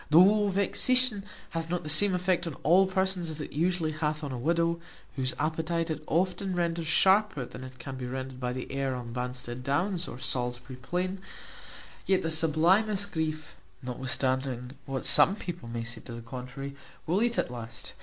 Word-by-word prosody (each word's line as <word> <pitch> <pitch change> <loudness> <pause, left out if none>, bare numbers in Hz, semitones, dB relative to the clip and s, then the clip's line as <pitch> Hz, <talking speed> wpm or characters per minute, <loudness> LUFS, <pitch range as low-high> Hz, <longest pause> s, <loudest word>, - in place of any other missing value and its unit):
Though 200 +6 +6
vexation 210 +3 +3 0.3
hath 165 -1 -3
not 180 0 -1
the - - -7
same 185 +5 +6
effect 180 -1 0
on 160 - -5
all 180 +6 +5
persons 190 -2 0
as 155 -1 -6
it 150 - -6
usually 165 +1 +1
hath 155 0 -2
on 140 - -4
a 130 - -4
widow, 170 +4 +1 0.4
whose 130 -1 -1
appetite 160 +2 -1
it 155 -1 -4
often 185 +3 0
renders 170 -1 -1
sharper 190 -5 +4
than 125 - -9
it 130 0 -10
can 130 +1 -7
be 125 -1 -5
rendered 130 0 -5
by 125 -1 -2
the 125 0 -5
air 135 -1 -1
on 120 -2 -6
Bansted 125 0 -4
Downs, 170 +7 -1
or - - -7
Salisbury 125 0 -2
Plain; 180 +9 -3 0.9
yet 190 -1 +3
the 165 - -1
sublimest 180 +6 +3
grief, 155 -2 -3 0.3
notwithstanding 130 0 -1 0.2
what 135 -1 -3
some 195 - +5
people 175 - -7
may 115 0 -3
say 115 0 -2
to 120 - -9
the 115 - -7
contrary, 125 +3 -7 0.3
will 180 +6 +1
eat 235 0 +1
at - - 0
last. 115 -1 -6
155 Hz, 180 wpm, -29 LUFS, 130-180 Hz, 0.9 s, Though